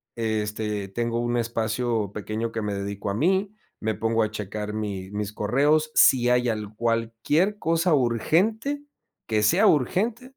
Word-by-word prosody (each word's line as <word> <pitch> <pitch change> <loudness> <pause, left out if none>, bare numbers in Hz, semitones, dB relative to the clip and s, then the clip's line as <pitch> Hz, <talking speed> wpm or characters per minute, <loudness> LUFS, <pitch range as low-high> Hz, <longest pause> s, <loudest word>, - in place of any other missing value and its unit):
este, 105 -2 -2
tengo 115 +2 -2
un 120 0 0
espacio 115 -2 -1
pequeño 110 +2 -3
que 115 - -3
me 105 -1 -2
dedico 100 +1 -4
a 100 - -1
mí, 190 - +1 0.2
me 110 -2 -1
pongo 115 +1 0
a 105 - -1
checar 105 0 -5
mi 100 -3 -4
mis 105 0 -4
correos. 145 +9 +2
Si 125 -2 +5
hay 125 0 +3
al 105 -1 -4
cualquier 115 - 0
cosa 165 -2 +2
urgente, 200 - +1 0.4
que 110 -2 0
sea 175 - +4
urgente" 210 - +1
115 Hz, 150 wpm, -25 LUFS, 105-150 Hz, 0.4 s, Si